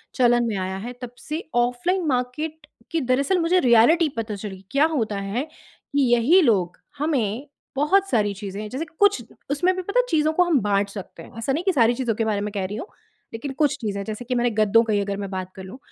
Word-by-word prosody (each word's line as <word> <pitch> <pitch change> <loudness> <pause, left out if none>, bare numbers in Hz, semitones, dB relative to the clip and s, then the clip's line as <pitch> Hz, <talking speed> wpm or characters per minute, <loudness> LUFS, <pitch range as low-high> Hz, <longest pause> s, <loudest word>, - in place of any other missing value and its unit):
चलन 240 -2 +4
में 220 - -2
आया 190 0 -3
है 245 - -5
तब 245 -1 -6
से 310 +4 -5
ऑफलाइन 245 +10 +1
मार्केट 290 +4 -2 0.2
की 330 - 0
दरअसल 275 +8 +1
मुझे 340 +2 +3
रियलिटी 255 +7 +5
पता 215 -2 -3
चली, 195 -2 -8
क्या 280 +3 +4
होता 225 -10 -1
है 200 +6 -2
कि 285 -2 -5
यही 265 +11 +5
लोग 190 - +2 0.2
हमें 260 -5 -1 0.3
बहुत 380 +8 +2
सारी 205 - +1
चीज़ें 200 0 -6
हैं, 215 - -6
जैसे 270 +8 -4
कुछ 405 -11 +4 0.3
उसमें 355 +6 +2
भी 370 - -3
पता 405 +7 0
है - - +3
चीज़ों 310 -3 +2
को 360 - +4
हम 340 -6 +2
बाँट 200 0 +1
सकते 195 -4 -9
हैं, - - -14
ऐसा 265 +4 -1
नहीं 325 - -1
कि 380 0 +2
सारी 240 -5 +4
चीज़ों 235 -3 -1
के 225 - -1
बारे 210 -2 0
में 210 0 -3
कह 195 -3 -2
रही 205 +3 -5
हूँ 255 - -6 0.5
लेकिन 245 +5 -5
कुछ 295 0 +1
चीजें 200 -3 -3
जैसे 215 +4 -6
कि 250 +1 -2
मैंने 240 0 +2
गद्दों 230 +2 +4
का 220 -2 -1
ही 205 - +2
अगर 200 0 -3
मैं 200 -1 -5
बात 185 -1 -5
कर 190 - -9
लूँ। 190 +7 -10
240 Hz, 235 wpm, -23 LUFS, 205-305 Hz, 0.5 s, रियलिटी